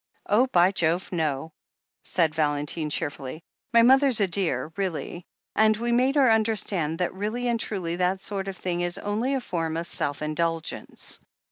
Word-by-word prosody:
"Oh, 235 +6 +3
by 180 -5 +4
Jove, 175 -1 0
no 160 -2 -2 0.2
!" - - -65
said 165 -4 +1
Valentine 150 0 -1
cheerfully. 145 0 -3 0.3
"My 235 -1 +6
mother's 265 -1 +5
a 200 - +4
dear, 175 -3 -1
really, 180 -2 -4 0.3
and 215 0 +4
we 235 +2 -1
made 255 +4 +3
her 265 -5 +5
understand 205 -8 +1
that 180 0 -1
really 215 +6 -2
and 235 -1 +1
truly 175 -6 -3
that 185 +1 +1
sort 195 0 -3
of 195 -1 -5
thing 175 -1 -2
is 175 0 -1
only 225 +7 -1
a - - 0
form 165 -8 -3
of 170 +1 -3
self 145 -2 -2
indulgence. 165 +1 -2
180 Hz, 170 wpm, -26 LUFS, 160-220 Hz, 0.3 s, My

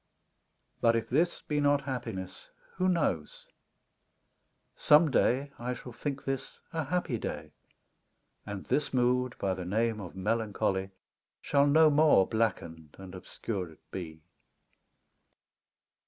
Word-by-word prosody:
But 115 0 +4
if 115 - -2
this 165 +6 +1
be 150 -1 -1
not 145 0 +3
happiness, 115 -9 -6 0.3
who 185 0 +2
knows? 145 - -1 1.3
Some 150 0 +5
day 135 +2 +2
I 125 +1 -3
shall 125 - -10
think 140 +4 -5
this 135 -1 -4
a 160 -2 -1
happy 150 -7 -1
day, - - -5 0.9
And 100 -2 -7
this 145 -2 0
mood 125 0 +2
by 95 -1 0
the 95 - -5
name 110 +4 0
of 90 -2 -9
melancholy 100 -2 -1 0.5
Shall 140 0 +2
no 155 +1 +6
more 145 -9 +5
blackened 80 -9 -2
and 95 -1 -10
obscured 90 -2 -6
be. 80 -4 -7
120 Hz, 120 wpm, -30 LUFS, 95-145 Hz, 1.3 s, no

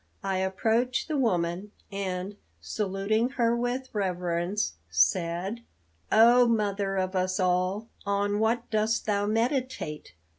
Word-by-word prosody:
I 190 -1 0
approached 220 +7 0
the 310 - -2
woman, 190 -5 0 0.2
and, 195 0 -3 0.2
saluting 200 - -1
her 235 -1 +3
with 245 +2 -2
reverence, 180 - -1 0.2
said: 170 - +1 0.5
"O 240 +2 +6
mother 200 -3 0
of 185 0 -1
us 185 0 0
all, 185 +4 +1 0.2
on 205 +1 0
what 230 +2 +1
dost 220 +1 +1
thou 205 -1 0
meditate? 230 - -2
200 Hz, 115 wpm, -27 LUFS, 185-225 Hz, 0.5 s, O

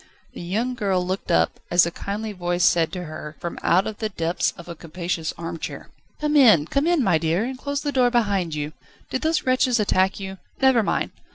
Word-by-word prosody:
The - - -8
young 215 +9 -1
girl 195 -6 0
looked 185 +2 -4
up, 80 0 +2
as 175 0 +5
a 170 - -2
kindly 210 +5 -4
voice 175 -2 -1
said 170 -3 +3
to 180 -1 -4
her, 155 -1 -8
from 175 -1 -5
out 185 +3 +3
the 220 - -2
depths 170 -3 -1
of 170 - -11
a 170 - -6
capacious 170 0 -4
armchair: 165 -1 -6 0.3
"Come 300 0 0
in, 220 - +6
come 275 - 0
in, 345 -5 +3
my 175 -7 +3
dear, 165 +5 +1
and 260 +3 -3
close 285 +2 -3
the 290 - -2
door 255 -3 +3
behind 200 -9 0
you! 150 +1 -4 0.4
Did 260 - -1
those 320 0 +1
wretches 255 -2 +2
attack 190 -2 +2
you? 190 -1 -7 0.2
Never 265 -3 +5
mind. 210 - -1
190 Hz, 205 wpm, -23 LUFS, 170-245 Hz, 0.4 s, in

